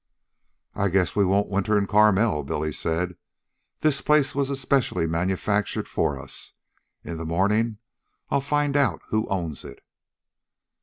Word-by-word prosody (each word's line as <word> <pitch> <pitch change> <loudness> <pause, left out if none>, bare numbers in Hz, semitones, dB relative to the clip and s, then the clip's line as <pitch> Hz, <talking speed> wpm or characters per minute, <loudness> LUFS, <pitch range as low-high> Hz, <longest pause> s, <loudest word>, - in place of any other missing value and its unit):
"I 100 0 0
guess 90 0 +1
we 100 - +4
won't 100 +2 +1
winter 100 +2 +1
in 100 - +1
Carmel," 105 -3 +3
Billy 75 +3 -2
said. 85 +3 -2 0.6
"This 155 -3 +2
place 150 -2 +3
was 140 0 -1
specially 130 -9 +1
manufactured 95 +5 -1
for - - -1
us. - - -6 0.5
In 85 - -6
the 80 - -5
morning 105 +6 +1 0.5
I'll 140 - +2
find 145 0 0
out 130 - +1
who 110 +1 0
owns 85 -7 -3
it." 70 -1 -12
100 Hz, 140 wpm, -25 LUFS, 90-130 Hz, 0.6 s, we